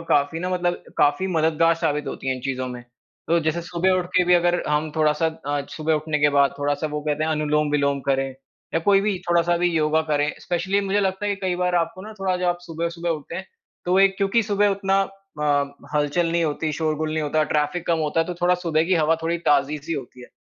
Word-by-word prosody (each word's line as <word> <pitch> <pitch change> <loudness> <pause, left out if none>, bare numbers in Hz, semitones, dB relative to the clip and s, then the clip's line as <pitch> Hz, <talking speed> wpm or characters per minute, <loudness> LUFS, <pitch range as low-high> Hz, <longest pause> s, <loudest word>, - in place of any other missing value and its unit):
काफ़ी 145 +3 +1
न 180 - -3
मतलब 175 -1 -1 0.2
काफ़ी 145 +6 +3
मददगार 165 +1 +3
साबित 150 -2 -1
होती 135 - -5
हैं 130 - +1
इन 130 - -7
चीज़ 135 -1 -3
में। 125 -1 -5 0.5
तो 170 - +4
जैसे 160 +2 -1
सुबह 180 +1 0
उठ 180 - -2
के 180 - +5
भी 180 0 +4
अगर 175 0 +2
हम 150 +1 0
थोड़ा-सा 155 +1 +2
अ, 145 -2 -3 0.2
सुबह 155 0 +1
उठने 155 0 -1
के 145 0 +4
बाद 140 -1 +3
थोड़ा-सा 145 +1 -1
वो 150 -1 -4
कहते 150 0 -1
हैं 160 - -1
अनुलोम-विलोम 150 -2 +1
करें 135 0 +1 0.5
या 165 - +2
कोई 195 +3 +4
भी 200 -2 0
थोड़ा-सा 170 0 +3
भी 175 +1 +2
योगा 160 0 +2
करें। 145 0 +1
स्पेशली 190 +3 0
मुझे 200 +1 0
लगता 195 +1 -1
है 205 - +1
कि 195 - -15
कई 180 - +1
बार 180 0 0
आपको 170 +2 -1
ना 215 +2 -8
थोड़ा 190 -1 +1
जब 180 - -3
आप 175 0 +1
सुबह-सुबह 170 +1 -3
उठते 155 0 -4
हैं 190 +1 -6 0.4
तो 180 +2 +2
एक 195 0 +4
क्योंकि 200 +4 +2
सुबह 205 -1 +2
उतना 195 0 +1 0.4
अ, - - -1 0.5
हल-चल 150 +3 +1
नहीं 170 0 +2
होती, 155 +1 -1
शोरगुल 155 0 -1
नहीं 155 0 -1
होता, 155 +1 +1
ट्रैफ़िक 150 +3 0
कम 165 -1 +2
होता 155 +1 0
है 165 - 0
तो 180 - -4
थोड़ा 180 +1 +4
सुबह 160 -2 +2
की 185 +2 +2
हवा 160 -1 +3
थोड़ी 165 +1 0
ताज़ी-सी 145 +2 +1
होती 130 -4 -6
है। 125 - -11
165 Hz, 230 wpm, -23 LUFS, 150-180 Hz, 0.5 s, के